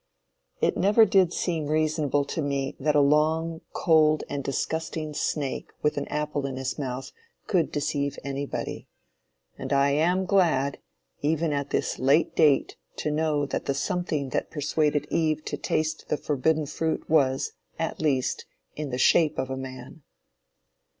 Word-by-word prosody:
It - - +2
never 210 +4 +5
did 190 -4 +4
seem 165 -5 -2
reasonable 155 -2 +1
to 160 - -3
me 140 -2 -2
that 150 +2 +1
a - - +6
long, 160 +3 +2
cold 155 -2 +3
and 140 -1 -4
disgusting 155 +2 -3
snake 145 -2 -2
with 150 - +2
an 145 - -3
apple 150 -2 -2
in 135 - -5
his 130 +2 -3
mouth, 130 -1 -4 0.3
could 175 -6 +1
deceive 145 -1 -1
anybody; 140 0 -4 0.7
and 135 - -5
I 140 0 +3
am 175 +6 +2
glad, 165 -8 +2 0.4
even 155 +1 +1
at 140 0 -2
this - - -1
late 140 +5 +3
date 145 -3 +3 0.2
to 150 - -2
know 150 -1 +1
that 140 - -3
the 140 - 0
something 155 -4 -1
that - - -2
persuaded 150 0 0
Eve 155 -2 0
to - - -3
taste 155 0 -2
the 150 - +1
forbidden 150 +2 0
fruit 160 +2 -2
was, 135 -4 +2 0.3
at - - -3
least, 135 -5 0 0.3
in 150 -1 -4
the 125 - -3
shape 155 +4 +4
of 130 - -2
a - - -1
man. 130 +3 -8
150 Hz, 155 wpm, -26 LUFS, 140-160 Hz, 0.7 s, a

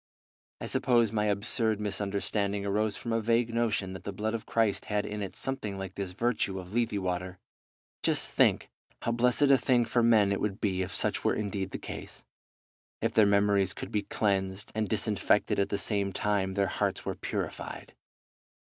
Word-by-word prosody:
I - - -5
suppose 120 -4 +2
my 105 -1 0
absurd 105 +1 0
misunderstanding 100 0 -1
arose 105 +1 0
from 115 - -4
a 115 - +1
vague 115 +1 +1
notion 110 -5 0
that 95 - -8
the 100 - -4
blood 105 +3 -2
of 115 - -4
Christ 110 -3 +1
had 105 -1 -1
in 105 0 -4
it 100 - -5
something 110 -7 -2
like 95 -1 -6
this 95 -2 -4
virtue 115 -3 0
of 90 +1 -8
Lethe 120 -1 +1
water. 90 -1 -3 0.6
Just - - +2
think - - +3 0.3
how 115 - 0
blessed 120 +3 +2
a 135 -2 +6
thing 120 -2 +3
for 120 +1 +1
men 110 -4 +4
it 100 - -1
would 100 -1 -2
be 95 -3 0
if 95 - -3
such - - 0
were - - +2
indeed 100 -2 -2
the - - -5
case, - - -9 0.7
if - - -1
their 110 -2 +5
memories 100 -1 +3
could - - -7
be 105 - +1
cleansed 95 -1 -1
and 110 -2 -1
disinfected - - +1
at 100 0 +1
the 100 - 0
same 100 -2 +1
time 95 -1 0
their 100 -1 +2
hearts - - -1
were - - -1
purified! - - -5
105 Hz, 185 wpm, -29 LUFS, 100-115 Hz, 0.7 s, a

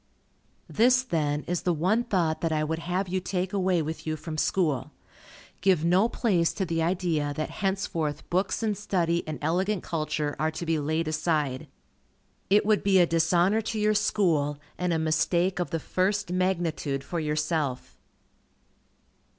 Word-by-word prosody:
This, 255 +3 +3
then, 150 - -1
is 175 0 -2
the 175 -2 0
one 190 +9 +1
thought 170 -8 0
that 165 - 0
I 155 -1 +1
would 160 +1 -2
have 180 +3 -2
you 185 +1 -1
take 185 0 -3
away 185 -4 +1
with 160 +1 -6
you 155 - 0
from 155 +1 -6
school. 155 -4 0 0.7
Give 180 -4 +3
no 185 +7 +4
place 180 -10 +1
to 190 - -2
the 165 -1 -1
idea 160 -4 0
that 155 - -3
henceforth 170 -6 -2
books 185 +5 0
and 215 -2 +1
study 175 -4 0
and 155 - -4
elegant 185 +5 0
culture 155 -2 -2
are 155 +2 +1
to 160 +2 -5
be 160 -1 +1
laid 155 +2 -1
aside. 155 -4 -1 0.8
It 205 +2 +4
would 215 -1 +3
be 195 -1 +3
a 180 - +6
dishonor 170 +5 +2
to 220 0 -3
your 210 0 +3
School, 170 -9 +1 0.2
and 180 0 -1
a 165 - +2
mistake 170 +4 +1
of 175 -4 -1
the 165 - -2
first 195 +3 -1
magnitude 170 -6 -1
for 170 - -3
yourself. 150 - -2
170 Hz, 165 wpm, -27 LUFS, 155-190 Hz, 0.8 s, a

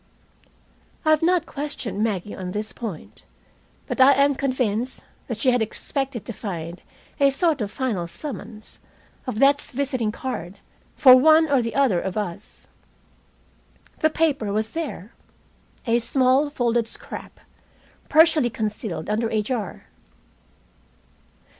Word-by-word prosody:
I 310 - +4
have 310 - +4
not 345 0 +2
questioned 265 - -4
Maggie 205 -3 -2
on 185 -1 -6
this 210 +1 -4
point, 210 -10 -8 0.6
but - - -1
I 270 +2 +8
am 280 +1 +3
convinced 255 -3 -2 0.2
that 235 - -3
she 250 +3 +2
expected 245 +2 -2
to 235 - -6
find 175 -4 -6 0.4
a 280 -1 +5
sort 300 0 +1
of 205 - -2
final 210 -8 -2
summons, 215 - -9 0.5
of 255 - -3
death's 280 +2 +3
visiting 255 -4 -1
card, 210 -6 -6 0.4
for 255 -2 +8
one 315 +4 +6
or 270 -3 +4
the 230 -1 -4
other 255 -11 +3
of 190 +1 -4
us. 180 -5 -6 1.3
The 315 - +3
paper 290 -10 0
was 215 +2 -1
there, 290 - -5 0.7
a 235 -1 +2
small 260 +4 +3
folded 240 -4 0
scrap, - - -8 0.7
partially 315 -5 +5
concealed 210 -7 -4
under 225 +2 0
a 215 -1 0
jar. 220 -3 -4
240 Hz, 130 wpm, -23 LUFS, 210-280 Hz, 1.3 s, I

